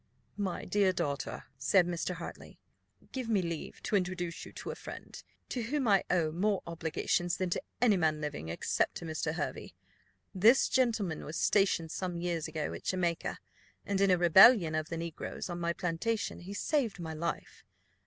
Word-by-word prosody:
"My 195 -4 -2
dear 195 0 +3
daughter," 145 -6 -3 0.2
said 175 +7 +4
Mr. 175 +1 -2
Hartley, 170 - -9 0.5
"give 255 -3 -4
me 215 -3 +3
leave 170 -2 -5
to - - 0
introduce 180 -3 -1
to - - -9 0.2
you - - -1
a - - -6
friend, - - -9 0.3
to 250 - -2
whom 260 +3 -1
I 200 -2 +5
owe 165 -3 +2
more 195 +4 0
obligations 170 +1 -1
than 185 -2 -1
to - - 0 0.2
any 225 -5 +4
man 155 -3 +1
living, 145 - -4
except 85 - 0
to 170 - -6
Mr. 160 0 -2
Hervey. 145 - -4 0.6
This 220 +8 +5
gentleman 225 -10 +1
was 155 - -5
stationed 190 -5 +2
some 180 -1 -3
years 170 -2 -2
ago 155 -1 -3
at - - -9
Jamaica, 175 -3 -1 0.5
and 195 -1 0
in 200 - +4
a 180 - +5
rebellion 175 +1 +7
of 155 0 -2
the 165 - -3
negroes 165 +2 -5
on 175 - -4
my 170 0 0
plantation 180 +6 -2
he 185 +3 -8
saved 235 - 0
my 160 -2 -5
life. 170 +2 -4
175 Hz, 175 wpm, -31 LUFS, 165-200 Hz, 0.6 s, rebellion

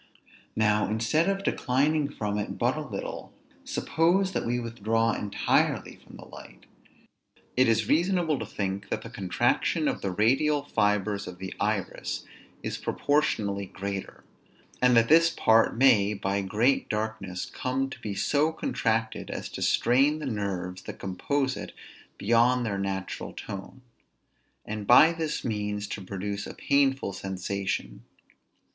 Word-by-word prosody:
Now, 105 -1 +2
instead 115 - +1
of 195 0 -1
declining 145 0 +1
from 105 -6 -3
it 105 - -4
but 120 +3 +1
a 155 - -3
little, 110 -10 -6 0.3
suppose 185 +4 +1
that - - -2
we 120 +1 0
withdraw 115 -1 0
entirely 100 -1 0
from - - -16
the - - -11
light; - - -13 0.9
it 130 +1 +4
is 110 -2 +2
reasonable 170 -3 +2
to - - -4
think 100 0 -4
that - - -2
the - - -9
contraction 90 -2 +1
of - - -1
the 100 - -1
radial 135 +10 +2
fibres 105 -5 0
of 90 0 -8
the 95 0 -6
iris - - -2 0.4
is - - -3
proportionally 100 -9 0
greater; 100 +1 -6 0.6
and 125 -1 +5
that 115 0 +5
this 165 +3 +6
part 115 -8 +3
may 105 -6 +5
by 100 0 -1
great 110 +8 +1
darkness 105 -4 -3
come 130 +1 -2
to - - -8
be 105 -2 -4
so 150 +9 +2
contracted, 110 -7 -1
as - - -5
to - - -7
strain 135 +5 +3
the 155 - -6
nerves 95 -6 -3
that - - -8
compose 130 +8 -1
it - - -7 0.4
beyond 120 +3 +3
their 100 -3 -2
natural 95 -1 -4
tone; 100 +6 -8 0.8
and 105 -1 -5
by 155 +7 +8
this 160 -2 -3
means 105 -2 -2
to 105 - -6
produce 100 +2 -4
a - - -8
painful 135 -7 +1
sensation. 95 -9 -3
110 Hz, 145 wpm, -27 LUFS, 100-135 Hz, 0.9 s, by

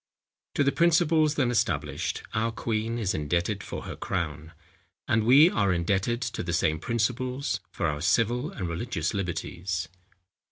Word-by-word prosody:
To 145 - +3
the 140 - +3
principles 160 -2 +3
then 130 -4 +2
established, 105 - -1
our 115 +2 0
queen 115 0 -2
is 105 -5 0
indebted 85 +7 -1
for - - -6
her - - -6
crown; 80 -3 -3 0.6
and 110 -1 +2
we 135 +8 +7
are 100 -3 +2
indebted 95 +7 0
to 115 -1 -3
the 85 0 -3
same 80 -1 +1
principles, 125 - -1
for - - -2
our 75 -2 -1
civil 120 - +2
and 95 - -5
religious 85 -1 -2
liberties. 90 -2 -3
110 Hz, 150 wpm, -27 LUFS, 85-125 Hz, 0.6 s, we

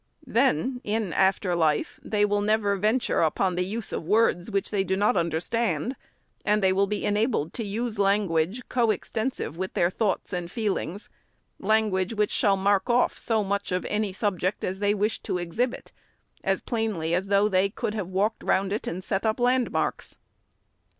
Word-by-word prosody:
Then, 250 - +1
in 210 -3 -1
after 190 -1 +2
life, 155 -3 0
they 210 -1 +1
will 205 0 +1
never 205 -1 +2
venture 215 +6 +1
upon 180 +4 +1
the 180 +1 0
use 210 +4 -4
of - - -2
words 190 -1 +2
which 195 -2 -1
they 200 -2 +1
do 190 0 0
not 205 +2 +2
understand; 185 - 0 0.5
and 210 -1 +2
they 190 0 +4
will 200 +1 +2
be 210 +1 -2
enabled 210 - 0
to 230 - -3
use 220 +1 -3
language, 195 +1 +1
co 240 -3 +1
extensive 220 - -2
with 190 0 -4
their 170 +1 +2
thoughts 200 -3 -1
and 175 -1 -3
feel 215 -1 -1
ings, 195 +6 -6 0.3
— - - -45
language 210 -1 +1
which 210 -1 +1
shall 200 -2 +3
mark 200 +3 +2
off 240 +1 +3
so 220 -2 +1
much 200 0 -2
of 180 0 -1
any 210 -1 -1
subject 190 -1 -1
as 190 +1 -2
they 205 0 +2
wish 210 +1 0
to - - -2
exhibit, 180 +9 -2 0.5
as - - 0
plainly 215 -9 -1
as 185 +3 0
though 200 +1 +4
they 195 -1 +2
could 210 - -3
have 210 -5 -3
walked 195 +4 0
round 195 +1 +1
it 210 - -3
and 180 +3 -4
set 195 +1 -1
up 220 0 0
landmarks. 250 +1 0
205 Hz, 185 wpm, -26 LUFS, 185-220 Hz, 0.5 s, they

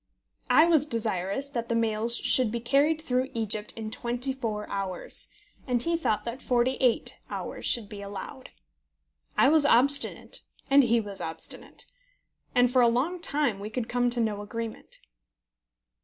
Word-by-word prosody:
I - - +6
was 315 -4 +3
desirous 220 0 -1
that 235 -4 -4
the 230 - 0
mails 230 +1 +1
should 250 -4 +4
be 235 - -2
carried 285 +6 +2
through 255 -2 0
Egypt 215 -1 -1
in 220 -1 -6
twenty 245 +3 -1
four 220 -5 -4
hours, 195 -3 -2 0.4
and 245 -2 +2
he 335 0 0
thought 270 -10 -1
that 240 +2 -5
forty 245 0 +1
eight 250 -3 +1 0.2
hours - - -5
should 230 -4 +2
be 205 -1 -9
allowed. 200 +7 -8 0.9
I - - +5
was 310 0 +5
obstinate, 280 +1 +2 0.3
and 280 +1 +8
he 235 -1 +3
was 205 -3 -6
obstinate; 160 0 -7 0.7
and 245 0 +3
for 255 - +5
a 240 - +6
long 285 +10 -1
time 280 -10 0
we 205 +1 -6
could 230 +1 -4
come 245 0 +1
to 240 0 -1
no 215 -3 -1
agreement. 225 +2 -7
235 Hz, 160 wpm, -27 LUFS, 215-265 Hz, 0.9 s, and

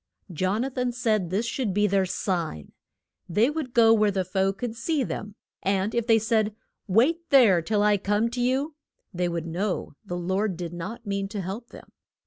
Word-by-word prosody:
Jon 185 +7 0
a 270 - -3
than 250 -1 -1
said 220 -7 0
this 200 +6 0
should 230 -4 -2
be 210 0 +3
their 195 -2 +2
sign: 170 - -3 0.6
They 215 - +3
would 300 -5 -4
go 225 -1 +6
where 215 -2 +4
the 190 -2 -1
foe 190 +1 +1
could 225 +3 -5
see 285 +4 0
them, 210 -3 -5 0.3
and 195 +2 0
if 235 -1 -1
they 225 -1 +6
said, 220 -1 +1 0.3
Wait 310 - +2
there 225 -11 +6
till 205 +4 +1
I 210 0 +4
come 205 +3 +1
to 245 0 -3
you, 265 +5 0 0.4
they 175 0 0
would 170 -1 -3
know 180 +2 -2
the 175 - -5
Lord 190 +2 -1
did 175 -1 -5
not 215 +8 -6
mean 200 -1 -2
to 200 0 -4
help 200 +6 -6
them. - - -14
210 Hz, 195 wpm, -26 LUFS, 185-235 Hz, 0.6 s, go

